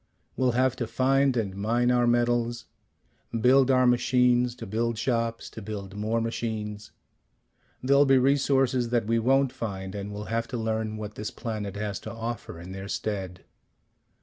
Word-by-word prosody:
We'll 130 -2 +1
have 130 +1 +2
to 120 - -2
find 130 +3 +2
and 100 -4 -2
mine 120 +5 +1
our 120 -1 +3
metals. 120 0 +1 0.7
Build 130 +3 +5
our 130 -1 +4
machines 125 0 +3
to - - -8
build 115 +3 -1
shops 115 0 -1
to 110 - -8
build 100 -2 -7
more 110 +3 0
machines. 110 -2 -4 0.9
There'll 140 +2 +5
be 135 0 +6
resources 135 -2 +2
that 120 -2 +1
we 115 +1 +1
won't 135 +3 +3
find, 95 -6 -5
and 100 0 -5
we'll 105 +1 -6
have 115 0 0
to 120 - -4
learn 110 -1 -2
what 105 -1 -6
this 105 - -5
planet 105 -4 -5
has 100 -1 -3
to - - -8
offer 115 -6 -5
in 90 +2 -9
their 95 +1 -7
stead. 95 -4 -4
115 Hz, 165 wpm, -27 LUFS, 105-125 Hz, 0.9 s, be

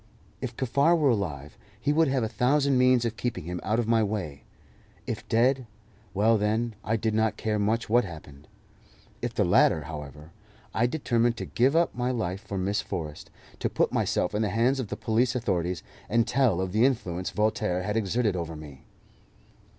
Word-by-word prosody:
If - - -5
Kaffar 140 +6 +3
were 145 -5 +3
alive, 75 - -3 0.2
he 145 +6 +1
would 160 +1 +4
have 130 -2 +1
a - - +1
thousand 135 +5 +2
means 125 -1 +4
of 115 -1 -2
keeping 120 -8 -3
him 90 +2 -4
out 110 +3 0
of 120 -2 0
my 115 -1 +3
way; 100 -9 -3 0.6
if - - -5
dead 125 +2 +2 0.5
well, 110 +2 +3
then, 110 +3 0
I 110 - 0
did 110 0 -1
not 110 -1 +1
care 110 -1 -1
much 110 +3 0
what 120 +3 +4
happened. 75 -5 -11 0.7
If - - -3
the - - +2
latter, 80 - +4
however, 75 0 -9 0.4
I 120 +3 +2
determined 120 -4 +1
to - - -4
give 130 +5 +2
up 170 0 +3
my 125 0 -1
life 100 -6 -2
for 100 -3 -6
Miss 100 +2 0
Forrest, 75 -3 -6 0.3
to - - 0
put - - 0
myself 90 - 0
in 105 - 0
the 105 - +1
hands 120 +6 +2
of 125 - -3
the - - -5
police 115 +2 +1
authorities, 90 -7 -1 0.3
and 115 +1 +2
tell 120 -7 +2
of 95 -1 -2
the 110 +4 +2
influence 95 -9 0
Voltaire 105 -4 0
had 105 +3 -2
exerted 110 -1 +1
over 85 -2 -4
me. 75 -3 -11
110 Hz, 190 wpm, -27 LUFS, 90-120 Hz, 0.7 s, would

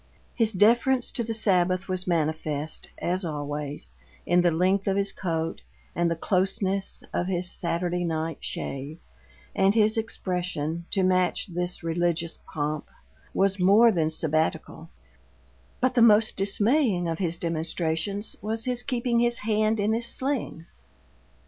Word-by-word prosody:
His 225 -2 +3
deference 235 +5 +3
to 235 - -2
the 225 0 -3
Sabbath 185 -3 +1
was 185 -1 0
manifest, 155 -2 -2
as 185 +2 -1
always, 145 - -4 0.3
in 175 +1 +4
the 175 - +4
length 185 +4 +1
of 195 0 +1
his 200 0 0
coat 165 -2 -3 0.3
and 170 0 +1
the 170 - 0
closeness 190 +2 -1
of 180 - -1
his 180 -1 -1
Saturday 175 0 -2
night 160 -2 -2
shave; 140 +3 -5 0.6
and 195 +2 +3
his 220 0 +4
expression, 180 -6 -3
to 195 - 0
match 185 0 +1
this 175 0 -3
religious 170 0 -1
pomp, 150 0 -2 0.4
was 195 0 +1
more 205 +6 +6
than 160 -5 +1
Sabbatical, 160 +1 -1 0.9
but 255 0 +2
the 245 - +3
most 220 -1 +5
dismaying 205 - +2
of 165 -1 -3
his 170 -3 -1
demonstrations 165 +4 -2
was 220 +2 -3
his 250 -1 0
keeping 245 -1 0
his 240 0 +2
hand 215 0 +1
in 205 +2 +1
his 235 +1 -1
sling. 260 - -3
185 Hz, 140 wpm, -26 LUFS, 165-215 Hz, 0.9 s, more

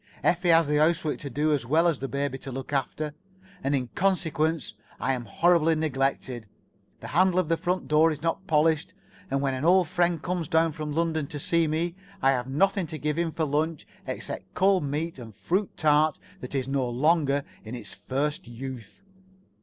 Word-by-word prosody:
Effie 175 +1 +2
has 165 0 +6
the 150 0 +1
housework 155 0 +2
to 140 - -6
do 150 +4 +1
as 140 -5 0
well 160 +8 +3
as 165 -5 +1
the 135 - -3
baby 140 0 -2
to 135 - -7
look 135 +2 -6
after, 150 +2 -2 0.5
and 140 +1 +1
in 130 -2 0
consequence, 165 -5 0 0.3
I 135 - +1
[Pg 120 -3 -7
57]am - - -16
horribly 165 - +3
neglected. 135 -6 -1 0.5
The - - -7
handle 185 +2 +3
of 180 -3 +1
the 165 - +3
front 180 +2 -2
door 155 +2 +5
is 150 0 -6
not 170 +3 -1
polished, 155 0 +2 0.3
and 135 0 0
when 135 -1 0
an 130 +2 -3
old 180 +1 +5
friend 175 -1 +1
comes 175 0 -2
down 160 +1 +3
from 150 0 -5
London 160 -1 0
to 145 - -6
see 165 +3 +1
me, 165 +3 -1 0.3
I 135 - +4
have 125 -2 -1
nothing 190 +6 +1
to 155 - -6
give 150 +2 -1
him 170 -1 0
for 160 0 -1
lunch 155 +2 -1 0.2
except - - -5
cold 190 -2 +3
meat 150 +2 -3
and 115 -3 -9
a - - -31
fruit 190 +3 -1
tart 150 -1 +3 0.2
that 125 +2 -7
is 130 -1 -1
no 135 -2 0
longer 145 +2 +2 0.2
in 110 +3 -7
its 115 -5 -6
first 135 +8 -2
youth. 125 - -8
150 Hz, 200 wpm, -27 LUFS, 135-165 Hz, 0.5 s, has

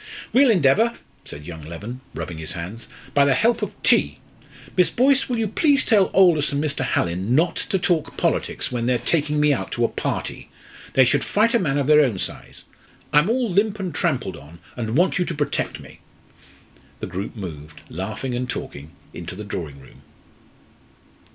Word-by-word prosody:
"We'll 265 +1 +6
endeavour," 215 - +3 0.3
said 75 +1 -9
young 80 -1 -8
Leven, 100 +11 -8
rubbing 85 -3 -5
his 80 - -3
hands, 95 +7 -6 0.3
"by 140 - +5
the 140 -1 +3
help 235 +1 +2
of - - -4
tea. - - +3 0.6
Miss 180 -2 +4
Boyce, 270 +2 +2
will 245 - 0
you 225 -1 0
please 280 +6 +2
tell 205 -5 +4
Aldous 170 -6 +4
and 140 +1 -1
Mr. 145 -3 -2
Hallin 95 +1 0
not 170 +3 +2
to 195 - -1
talk 175 -4 0
politics - - 0
when 120 -1 -2
they're 125 -1 +3
taking 150 +1 0
me 150 -1 +4
out - - -4
to 120 - +1
a - - +3
party. - - -4 0.4
They 130 - +6
should 135 +2 +2
fight 220 +3 +2
a 235 - +4
man 145 -7 0
of 140 - +1
their 150 +1 +6
own 125 -9 +1
size. - - -5 0.5
I'm 150 +6 +4
all 245 +1 +1
limp 205 +3 +1
and 185 -4 -4
trampled - - -1
on, 75 +4 -14 0.2
and 115 +1 -2
want 180 +1 +2
you 180 - +1
to 170 - -4
protect 145 -1 -2
me." - - -14 1.0
The - - -4
group 95 +5 -5
moved, 80 -7 -8
laughing 110 +8 -5
and 125 0 -3
talking, 70 +2 -6 0.2
into - - -7
the 105 - -7
drawing 80 -8 -6
room. 65 - -17
140 Hz, 185 wpm, -22 LUFS, -, 1.0 s, We'll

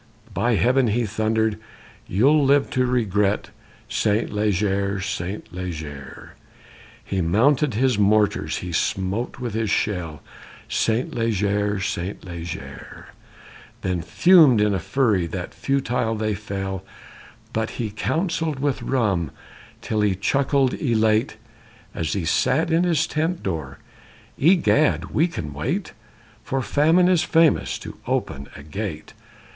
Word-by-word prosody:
_ - - -16
By 115 +5 +1
Heaven! 125 +4 +3
he 115 +2 +1
thundered, 110 +1 0 0.5
you'll 140 +10 +3
live 140 0 +3
to 130 0 +1
regret 105 -4 0 0.4
Saint 105 +1 0
Leger, 100 -1 0
Saint 95 0 -5
Leger! 80 -6 -7 0.7
He 95 -1 -1
mounted 125 - +2
his 125 -2 +2
mortars, 105 0 +2
he 90 - -5
smote 95 +7 -1
with 120 -4 -4
his 110 -1 -1
shell, 85 -8 -2 0.4
Saint 115 +2 0
Leger, 105 -3 0
Saint 95 0 -4
Leger; 85 -2 -8 0.7
Then 90 -2 -1
fumed 150 - +5
in 105 0 +2
a 95 - 0
fury 105 -7 +1
that - - -6
futile 125 -4 -1
they 110 0 -1
fell; 95 -2 -4 0.7
But 110 0 -2
he 110 -3 -3
counselled 160 - -1
with 140 0 -1
rum 100 - 0 0.5
till 110 -1 -1
he 105 -2 +2
chuckled, 135 +6 +1
elate, 110 -4 +1 0.6
As 80 -2 -2
he 95 -5 -2
sat 145 - +1
in 165 +2 +3
his 160 -3 +2
tent 160 +3 -2
door, 80 -7 -4 0.6
Egad, 160 -2 +3
we 160 +4 +3
can 75 - -6
wait, 70 - -3 0.5
For 135 -1 -2
famine 160 +7 +3
is 180 -3 +4
famous 165 -1 +2
to - - -10
open 70 +1 -2
a 75 - -10
gate! 80 0 -6
110 Hz, 130 wpm, -23 LUFS, 95-135 Hz, 0.7 s, fumed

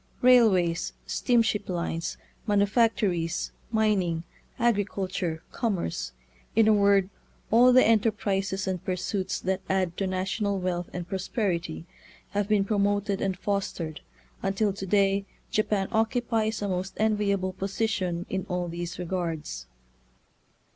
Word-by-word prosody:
Railways, 190 -10 +4
steamship 225 -5 +1
lines, 170 -2 -2 0.3
manufactories, 205 -5 +1 0.2
mining, 195 -7 +1 0.3
agriculture, 195 -7 -1
commerce 195 - -2 0.2
— 60 0 -32
in 225 0 +5
a 220 - +6
word, 200 -1 +4 0.4
all 245 +3 +7
the 255 +1 +6
enterprises 200 -3 +1
and 185 -2 -2
pursuits 185 +1 -2
that 190 0 -1
add 185 -3 +1
to 195 - 0
na 185 0 -1
tional 200 0 -1
wealth 180 -1 -2
and 180 -1 -5
prosperity 180 - -2 0.2
— - - -26
have 205 -1 0
been 210 -2 +3
promoted 205 -1 +1
and 190 -2 -1
fostered, 190 -6 -3 0.4
until 195 +1 +1
to 195 0 -6
day 195 0 +2 0.2
Japan 210 -2 +1
occupies 225 -1 0
a - - 0
most 185 0 -3
enviable 200 -3 +1
position 190 -3 -1
in 190 0 -3
all 180 -1 -1
these 170 0 -5
regards. 165 - -4
195 Hz, 125 wpm, -27 LUFS, 180-210 Hz, 0.4 s, all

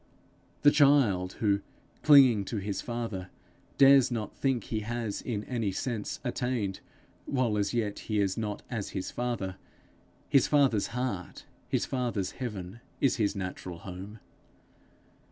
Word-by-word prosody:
The 145 - +8
child 135 -12 +4
who, 100 -2 +1 0.4
clinging 130 -8 +7
to 110 - -4
his 100 0 -3
Father, 115 -6 -4 0.5
dares 135 -1 +7
not 115 -4 -4
think 130 -5 0
he 110 - -3
has 115 -1 -3
in 105 -4 -3
any 115 -5 -2
sense 110 +1 -3
attained 120 -6 -2 0.5
while 125 -5 +1
as 100 -1 0
yet 110 -4 -1
he 105 -2 -2
is 95 -2 +1
not 105 -2 -4
as 115 -5 -4
his 95 - -4
Father 115 -7 -3 0.7
his 135 -3 +4
Father's 135 -8 +3
heart, 105 -8 -4 0.2
his - - +1
Father's 115 -7 -2
heaven 105 -5 -6 0.2
is 135 - +2
his 105 -3 +1
natural 90 -2 -5
home. 95 +4 -8
110 Hz, 135 wpm, -29 LUFS, 100-125 Hz, 0.7 s, The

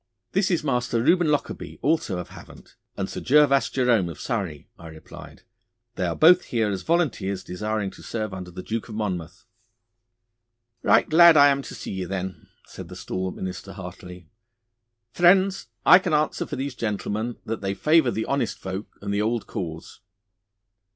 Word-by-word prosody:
'This 195 0 +1
is 170 -4 0
Master 125 -4 0
Reuben 175 +8 +3
Lockarby, 150 -1 -2
also 145 - +1
of 90 - -6
Havant, - - -14 0.2
and - - -2
Sir - - -6
Gervas 140 0 +4
Jerome 120 -9 +2
of 85 - -9
Surrey,' 95 -11 -4
I 85 - -10
replied. 80 -1 -12 0.5
'They - - -2
are - - -2
both 175 +3 +6
here 110 -3 0
as 95 - -3
volunteers 110 - -1
desiring 105 +2 -3
to - - -15
serve 110 -3 -4
under 90 -1 -7
the 90 +1 -9
Duke 115 +1 -4
of 110 - -7
Monmouth.' 90 -6 -4 1.4
'Right - - +4
glad 170 0 +7
I 145 0 +8
am 140 0 +1
to - - -9
see - - -7
ye, 95 -1 -4
then,' 95 0 -5 0.2
said - - -10
the - - -9
stalwart 95 0 -4
minister 95 +1 -6
heartily. 90 -2 -10 0.9
'Friends, 185 +2 +3 0.2
I 180 - +9
can 180 -4 -2
answer 150 +1 0
for - - -5
these 135 +1 -4
gentlemen 110 0 -3
that 115 +1 -4
they 100 0 -2
favour 155 -1 +3
the 110 -1 -2
honest 135 -4 -1
folk 95 +2 -6 0.2
and 100 0 -2
the 100 - +1
old 115 +1 -1
cause. 80 -3 -7
110 Hz, 170 wpm, -24 LUFS, 95-145 Hz, 1.4 s, I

